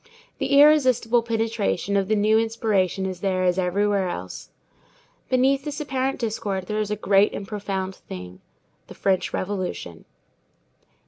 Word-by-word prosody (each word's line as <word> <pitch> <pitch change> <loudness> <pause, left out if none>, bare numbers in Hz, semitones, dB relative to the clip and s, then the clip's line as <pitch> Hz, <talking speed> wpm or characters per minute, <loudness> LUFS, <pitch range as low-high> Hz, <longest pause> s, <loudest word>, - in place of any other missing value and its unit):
The 280 - +3
irresistible 255 -6 +5
penetration 225 -4 -1
of 195 -1 +1
the 215 - +2
new 215 +1 +3
inspiration 215 -5 0
is 185 -2 -4
there 185 -1 0
as 180 0 +2
everywhere 195 +1 +1
else. - - -7 0.8
Beneath 265 +2 +2
this 295 0 -5
apparent 270 -2 -1
discord 210 -5 -3
there 210 +3 -2
is 210 -1 -1
a 210 - -1
great 200 0 +3
and 200 - -5
a - - -19
profound 195 -2 -3
thing,—the 90 - -13
French 190 -2 0
Revolution. 185 - -4
205 Hz, 140 wpm, -24 LUFS, 190-230 Hz, 0.8 s, irresistible